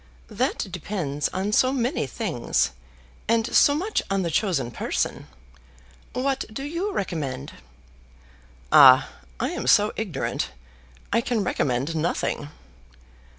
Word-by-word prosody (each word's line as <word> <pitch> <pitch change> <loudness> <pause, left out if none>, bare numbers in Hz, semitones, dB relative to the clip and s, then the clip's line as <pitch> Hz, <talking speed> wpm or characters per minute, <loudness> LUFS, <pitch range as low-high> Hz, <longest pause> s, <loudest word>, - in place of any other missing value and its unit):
"That - - 0
depends 150 -8 -3
on 190 +3 -2
so 255 +4 +4
many 245 - -1
things, 120 - -1 0.6
and 225 0 +2
so 285 - +6
much 390 +8 -1
on 195 -1 0
the 170 - -2
chosen 175 - 0
person. - - -2 0.9
What 270 +1 -1
do 270 +5 -5
you 335 +8 -3
recommend?" 145 - -3 1.2
"Ah, - - +8 0.3
I - - 0
am - - -4
so 210 +1 +5
ignorant. 185 -11 -3 0.6
I 230 - +3
can 230 -3 -1
recommend 140 -2 -1
nothing." 155 -2 -1
195 Hz, 115 wpm, -24 LUFS, -, 1.2 s, Ah